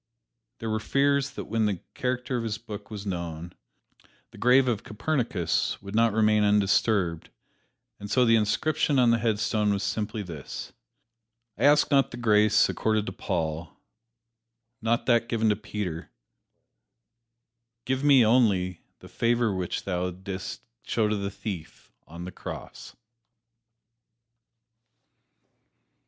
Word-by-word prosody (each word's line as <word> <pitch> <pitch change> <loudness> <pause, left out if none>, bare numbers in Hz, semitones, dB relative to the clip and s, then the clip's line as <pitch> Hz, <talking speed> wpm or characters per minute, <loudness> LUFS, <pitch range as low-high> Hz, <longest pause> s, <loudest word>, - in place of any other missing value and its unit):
There 115 - -5
were 110 - 0
fears 140 +4 +1
that - - -6
when 110 0 0
the 100 -4 -2
character 125 +1 -2
of 120 - -1
his 110 -1 -2
book 105 -3 -9
was 105 -2 -7
known, 85 -3 -5 0.8
the - - -14
grave 130 +2 +5
of 115 -3 0
Copernicus 110 - -1
would 100 0 -9
not 115 +1 +3
remain 105 0 +3
undisturbed, 100 -4 +2 0.7
and 105 - -8
so 125 +4 +3
the 115 -1 +5
inscription 140 +7 +1
on 125 -2 +5
the 115 - +2
headstone 105 -1 +1
was 100 -1 -1
simply 105 +1 -2
this: 80 -7 -8 0.8
"I - - 0
ask 145 +1 +5
not 135 -1 +4
the 120 - -8
grace 105 -2 +4
accorded 110 -1 0
to - - -4
Paul; 80 -3 -3 1.0
not 115 +1 0
that 120 -1 +2
given 110 -2 +1
to 105 - +3
Peter; 95 -5 -5 1.8
give 130 +1 -1
me 140 -5 +6
only 100 -7 +2 0.2
the - - -12
favor 120 -2 +1
which 90 -2 -3
Thou 90 -1 -1
didst 95 +1 -7 0.2
show 110 -2 0
to 105 - 0
the 100 -1 -3
thief 100 -5 -8 0.2
on 85 +2 -8
the 90 - -6
cross." - - -9
105 Hz, 135 wpm, -27 LUFS, 100-120 Hz, 1.8 s, me